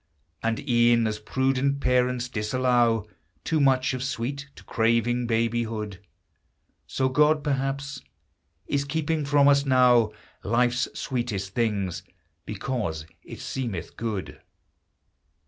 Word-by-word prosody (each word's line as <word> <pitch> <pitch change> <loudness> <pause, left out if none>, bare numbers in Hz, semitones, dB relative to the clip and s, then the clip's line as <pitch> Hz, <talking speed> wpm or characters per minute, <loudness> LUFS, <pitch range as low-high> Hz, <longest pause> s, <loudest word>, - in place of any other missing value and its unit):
And 115 +5 -2
e'en 120 -1 +4
as 105 -1 -2
prudent 135 +4 0
parents 125 -1 +1
disallow 120 -1 +1 0.4
Too 160 - 0
much 130 -1 +3
of 130 - -4
sweet 140 +2 -3
to - - -14
craving 115 +1 +1
babyhood, 115 -3 -1 0.9
So 130 - 0
God, 150 +3 +3
perhaps, 135 -1 -2 0.6
is 140 -1 0
keeping 155 +1 -1
from 140 0 +4
us 140 0 +5
now 125 -4 +4 0.3
Life's 120 +3 +1
sweetest 110 -7 -3
things, 100 -7 -1 0.5
because 105 - -3 0.2
it - - -10
seemeth 115 -11 -4
good. 110 -4 -5
125 Hz, 110 wpm, -26 LUFS, 115-135 Hz, 0.9 s, us